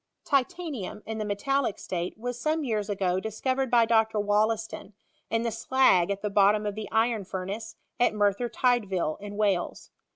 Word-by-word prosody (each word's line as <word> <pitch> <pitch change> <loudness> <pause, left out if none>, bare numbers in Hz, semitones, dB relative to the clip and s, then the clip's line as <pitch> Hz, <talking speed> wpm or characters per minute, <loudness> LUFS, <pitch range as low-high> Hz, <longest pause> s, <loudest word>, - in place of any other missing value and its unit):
Titanium, 275 - -1
in 220 0 -4
the - - -1
metallic 240 +3 0
state, 175 +1 -4
was 245 +2 -4
some 310 0 0
yean 220 -6 0
ago 190 -3 0
diacoTcred 260 +5 -1
by 235 -1 +5
Dr. 220 -1 +2
Wollaaton, 210 0 0 0.4
in 225 +1 0
the 230 - -1
slag 230 -6 +3
at 200 0 -3
the 210 - 0
bottom 205 +1 +4
of 205 - -1
the 215 0 -6
iron 225 -1 +2
furnace, 195 +4 -5 0.2
at 240 -3 +3
Merthyr 205 +3 +1
Tydvil, 200 -12 +1
b 205 - -7
Wales. 200 -3 -1
215 Hz, 165 wpm, -27 LUFS, 200-240 Hz, 0.4 s, by